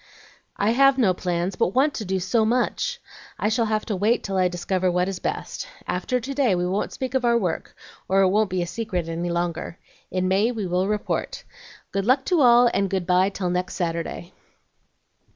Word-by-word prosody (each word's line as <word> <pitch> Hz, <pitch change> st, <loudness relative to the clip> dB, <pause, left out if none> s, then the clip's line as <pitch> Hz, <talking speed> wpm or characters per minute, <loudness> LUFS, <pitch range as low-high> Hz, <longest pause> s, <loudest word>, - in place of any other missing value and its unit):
"I 205 Hz, +2 st, +2 dB
have 275 Hz, +2 st, +5 dB
no 210 Hz, -8 st, +3 dB
plans, 180 Hz, +1 st, -2 dB
but 190 Hz, -, 0 dB
want 280 Hz, +3 st, +3 dB
to 215 Hz, -, -5 dB
do 190 Hz, 0 st, -1 dB
so 220 Hz, +5 st, +1 dB
much! 250 Hz, -, 0 dB, 0.4 s
I 210 Hz, -, 0 dB
shall 225 Hz, +1 st, +1 dB
have 215 Hz, 0 st, -1 dB
to 210 Hz, -, -2 dB
wait 215 Hz, +6 st, +1 dB
till 195 Hz, -, -3 dB
I 185 Hz, -1 st, +3 dB
discover 180 Hz, +1 st, -1 dB
what 180 Hz, +1 st, +1 dB
is 195 Hz, -2 st, -4 dB
best. -, -, -4 dB, 0.2 s
After 250 Hz, +8 st, -1 dB
to 265 Hz, +4 st, -5 dB
day 260 Hz, -8 st, +2 dB
we 175 Hz, 0 st, -1 dB
won't 190 Hz, +3 st, -1 dB
speak 260 Hz, -1 st, -5 dB
of 265 Hz, -1 st, +1 dB
our 235 Hz, -1 st, +4 dB
work, 180 Hz, -7 st, -3 dB, 0.3 s
or 195 Hz, +1 st, +4 dB
it 190 Hz, -, +4 dB
won't 210 Hz, +1 st, +2 dB
be 180 Hz, -1 st, -1 dB
a -, -, -3 dB
secret 180 Hz, -2 st, -3 dB
any 170 Hz, +1 st, -3 dB
longer. 170 Hz, 0 st, -3 dB, 0.3 s
In 185 Hz, 0 st, -1 dB
May 200 Hz, +5 st, +2 dB
we 220 Hz, -5 st, -3 dB
will 180 Hz, +1 st, 0 dB
report. 210 Hz, 0 st, -2 dB, 0.5 s
Good 195 Hz, +1 st, -2 dB
luck 265 Hz, +1 st, +3 dB
to 350 Hz, -4 st, +2 dB
all, 245 Hz, -1 st, +7 dB
and 195 Hz, -1 st, +1 dB
good 190 Hz, -2 st, -1 dB
by 185 Hz, +2 st, +3 dB
till 190 Hz, -3 st, -3 dB
next 180 Hz, +1 st, -2 dB
Saturday." 170 Hz, 0 st, -3 dB
195 Hz, 205 wpm, -24 LUFS, 180-235 Hz, 0.5 s, all